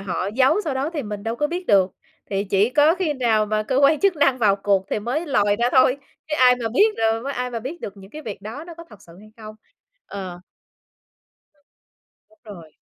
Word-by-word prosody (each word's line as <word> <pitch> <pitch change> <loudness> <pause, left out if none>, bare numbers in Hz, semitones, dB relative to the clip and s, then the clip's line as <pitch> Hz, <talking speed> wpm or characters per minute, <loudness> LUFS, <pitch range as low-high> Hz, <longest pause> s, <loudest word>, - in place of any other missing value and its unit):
họ 190 -1 -3
giấu 265 +10 +3
sau 290 -4 -2
đó 275 +4 -2
thì 300 -5 -4
mình 210 -2 -6
đâu 225 +2 -3
có 295 - 0
biết 355 +3 -5
được, 190 -2 +4 0.4
thì 195 0 -1
chỉ 200 +3 +1
có 295 +4 +4
khi 360 -5 -1
nào 225 -5 +1
mà 215 0 -1
cơ 255 - -2
quan 285 +2 +4
chức 395 -3 +2
năng 270 -3 +2
vào 200 -3 +3
cuộc 195 -1 0
thì - - 0
mới 260 +10 -3
lòi 205 -6 +2
ra 240 +2 +1
thôi, 260 0 +4 0.3
chứ 300 - -1
ai 250 -1 +6
mà 230 -2 -3
biết 420 - +2
rồi 225 +5 0
ai 250 -1 -3
mà 235 - -4
biết 300 +8 -7
được 200 0 -7
những 195 +1 -14
cái 310 +3 -9
việc 205 -6 -8
đó 230 +9 -7
nó 340 - -10
có 335 0 -11
thật 205 - -16
sự 170 0 -17
hay 215 - -16
không? 215 -1 -10 0.5
Ờ. 185 -3 -7 1.1
Ừm, 290 - -37 0.7
đúng 325 - -27
rồi. 170 -8 -12
235 Hz, 235 wpm, -22 LUFS, 205-290 Hz, 1.1 s, ai